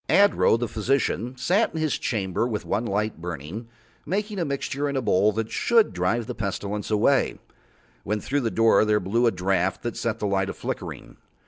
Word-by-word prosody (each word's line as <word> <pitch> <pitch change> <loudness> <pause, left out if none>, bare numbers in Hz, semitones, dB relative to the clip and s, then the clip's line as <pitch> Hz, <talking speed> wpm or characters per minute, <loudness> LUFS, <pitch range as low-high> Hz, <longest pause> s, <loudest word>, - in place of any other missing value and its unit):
Adro, 200 - +5
the 120 0 -2
physician, 120 +2 -1
sat 180 - +1
in - - -2
his 155 -3 0
chamber 100 0 -1
with 110 -4 -3
one 115 - -1
light 105 -3 -2
burning, 85 - -6 0.4
making 205 +4 -2
a 170 - 0
mixing 140 0 -2
in 140 - -2
a - - +1
bowl 105 0 +3
that 110 +1 -3
should 230 -2 +3
drive 110 +6 0
the 125 - -5
Pestilence 105 -1 -3
away, 110 +6 +2 0.7
when 105 +2 -1
through 140 +6 -1
his 115 - 0
door 115 -1 +5
there 105 -1 +2
blew 115 +6 +1
a - - +4
draught 95 0 0
that 120 - -3
set 115 -2 -2
the - - -3
light 95 -1 0
a - - -3
flickering. - - -6
115 Hz, 195 wpm, -25 LUFS, 100-135 Hz, 0.7 s, Adro